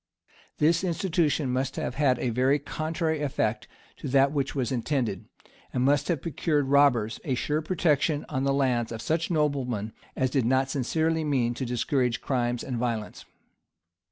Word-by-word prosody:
[*] -, -, -29 dB
This 165 Hz, +3 st, +3 dB
institution 165 Hz, -5 st, 0 dB
must 130 Hz, +1 st, -1 dB
have -, -, -3 dB
had 135 Hz, -2 st, +2 dB
a 120 Hz, -, -1 dB
very 130 Hz, +4 st, +3 dB
contrary 155 Hz, +2 st, -2 dB
effect 120 Hz, -7 st, -1 dB, 0.3 s
to -, -, -6 dB
that 135 Hz, +1 st, +4 dB
which 140 Hz, -2 st, -2 dB
was 130 Hz, -3 st, -1 dB
intended, 120 Hz, -5 st, -1 dB, 0.5 s
and 125 Hz, -, 0 dB
must 145 Hz, +1 st, +2 dB
have 165 Hz, -6 st, -1 dB
procured 150 Hz, -3 st, 0 dB
robbers 125 Hz, -6 st, +3 dB
a 135 Hz, -7 st, -1 dB
sure 150 Hz, +4 st, -1 dB
protection 155 Hz, -3 st, +1 dB
on 130 Hz, -, -2 dB
the 140 Hz, -, +2 dB
lands 125 Hz, -4 st, +1 dB
of 115 Hz, -, -5 dB
such 160 Hz, +1 st, 0 dB
noblemen 135 Hz, -, -1 dB, 0.2 s
as 130 Hz, -1 st, 0 dB
did 130 Hz, -5 st, +1 dB
not 130 Hz, +1 st, +2 dB
sincerely 160 Hz, +5 st, 0 dB
mean 130 Hz, -5 st, +1 dB
to 130 Hz, +1 st, -4 dB
discourage 125 Hz, 0 st, 0 dB
crimes 120 Hz, -2 st, -1 dB
and 125 Hz, -3 st, -3 dB
violence. 115 Hz, -3 st, -3 dB
135 Hz, 165 wpm, -27 LUFS, 125-150 Hz, 0.5 s, that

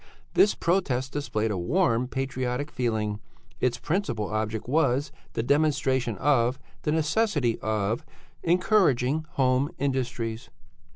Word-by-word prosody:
This 205 Hz, -, +5 dB
protest 135 Hz, -8 st, 0 dB
displayed 110 Hz, -7 st, -1 dB
a 100 Hz, -, -1 dB
warm, 125 Hz, -, +1 dB
patriotic 130 Hz, +1 st, -2 dB
feeling; 110 Hz, -4 st, -1 dB, 0.4 s
its 125 Hz, -1 st, +1 dB
principal 125 Hz, -, -1 dB
object 110 Hz, +1 st, -2 dB
was 140 Hz, 0 st, +2 dB, 0.2 s
the 115 Hz, -, -1 dB
demonstration 135 Hz, -5 st, +1 dB
of 130 Hz, 0 st, +2 dB, 0.2 s
the 150 Hz, -, 0 dB
necessity 155 Hz, -, +1 dB
of 110 Hz, +5 st, -1 dB, 0.4 s
encouraging 160 Hz, -, +2 dB
home 130 Hz, +1 st, +2 dB
industries. 125 Hz, -4 st, -2 dB
130 Hz, 110 wpm, -27 LUFS, 115-150 Hz, 0.4 s, This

